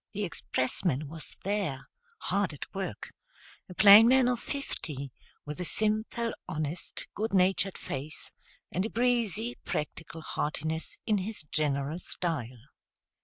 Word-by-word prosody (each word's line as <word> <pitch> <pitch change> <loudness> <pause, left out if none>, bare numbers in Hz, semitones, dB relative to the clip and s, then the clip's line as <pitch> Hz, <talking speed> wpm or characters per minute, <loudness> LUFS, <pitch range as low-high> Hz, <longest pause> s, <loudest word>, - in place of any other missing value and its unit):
The 210 0 -2
expressman 150 -2 -1
was 160 +2 -9
there, 195 -9 -1 0.3
hard 200 - 0
at 145 - -8
work, 195 -1 -4 0.6
a 180 - -9
plain 210 +3 +10
man 260 0 +6
of 245 -2 +1
fifty, 150 - -4 0.3
with 150 +4 -5
a - - -2
simple, 220 +3 0 0.2
honest, 155 +2 -3
good 215 0 -1
natured 190 +1 +3
face, 140 +3 -5 0.4
and 185 - 0
a 220 - -2
breezy, 235 -2 +1
practical 160 +2 -4
heartiness 160 +1 -2
in 210 -2 +3
his 200 -2 -5
general 150 +1 0
style. 140 -11 -3
180 Hz, 125 wpm, -30 LUFS, 150-215 Hz, 0.6 s, plain